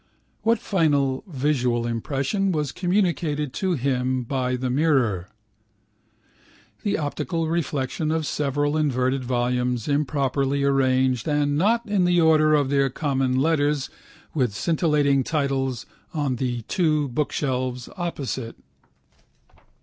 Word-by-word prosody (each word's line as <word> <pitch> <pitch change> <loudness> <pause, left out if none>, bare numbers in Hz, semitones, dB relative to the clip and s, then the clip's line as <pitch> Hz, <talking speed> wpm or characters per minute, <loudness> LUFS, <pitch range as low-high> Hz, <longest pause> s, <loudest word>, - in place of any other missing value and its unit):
What 230 +1 +3
final 145 - +1
visual 130 -6 0
impression 140 - -1
was 150 -5 -1
communicated 170 -7 0
to 190 -2 0
him 130 -2 0
by 125 0 -1
the 125 0 -2
mirror? 125 - +1 1.5
The 205 - 0
optical 155 +2 -2
reflection 155 -3 -1
of 160 0 0
several 145 +1 0
inverted 130 -3 0
volumes 125 -1 -1
improperly 140 -1 0
arranged 130 -3 +2
and 145 -1 +1
not 225 +9 +2
in 205 -4 +1
the 175 0 +3
order 155 -2 +5
of 140 -2 +1
their 140 -1 +3
common 135 -2 0
letters 145 -2 +1 0.4
with 125 -9 0
scintillating 150 - +2
titles 135 -4 -1 0.3
on 140 -5 0
the 120 -2 -2
two 155 - +1
bookshelves 130 -2 -2
opposite. 140 -9 -4
140 Hz, 110 wpm, -24 LUFS, 130-155 Hz, 1.5 s, order